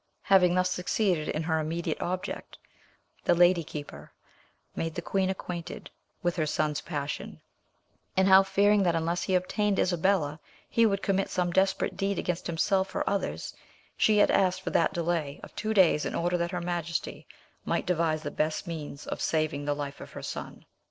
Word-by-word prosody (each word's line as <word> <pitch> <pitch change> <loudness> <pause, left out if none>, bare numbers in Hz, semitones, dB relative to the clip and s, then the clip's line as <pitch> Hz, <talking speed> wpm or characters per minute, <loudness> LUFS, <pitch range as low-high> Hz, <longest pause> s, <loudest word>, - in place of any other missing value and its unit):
Having 180 -2 +5
thus 185 0 +2
succeeded 180 -3 0
in 155 - -1
her 160 0 +1
immediate 160 +1 -2
object, 185 +1 -4 0.7
the 175 - +3
lady 175 0 +5
keeper 145 - -8 0.6
made 165 -1 -3
the 175 - -3
queen 190 +1 0
acquainted 180 -3 -6 0.3
with 175 0 0
her 155 -2 +1
son's 150 -1 0
passion, 145 -1 -5 0.8
and 190 0 +4
how, 190 0 +8
fearing 200 +2 +3
that 175 -3 +2
unless 165 +2 0
he 190 - 0
obtained 200 +2 +1
Isabella 175 -4 +1 0.3
he 230 -1 +4
would 200 -1 -1
commit 195 -1 +1
some 180 -1 0
desperate 190 +1 +1
deed 195 0 0
against 175 -1 -2
himself 190 +3 0
or - - -1
others, 200 - -2 0.4
she 215 -1 +3
had 205 - +5
asked 185 -1 +2
for - - -3
that - - +3
delay 165 -5 -2
of - - -11
two 215 - -2
days 185 -7 +4
in - - -3
order 175 +1 0
that 170 0 0
her 175 -1 -3
majesty 170 -1 -3 0.4
might - - -1
devise 165 -3 0
the - - -4
best 155 +3 -1
means 155 -4 -6
of - - -5
saving 155 -2 0
the 145 0 0
life 145 -1 -6
of - - -10
her - - -8
son. - - -7
175 Hz, 180 wpm, -28 LUFS, 160-190 Hz, 0.8 s, how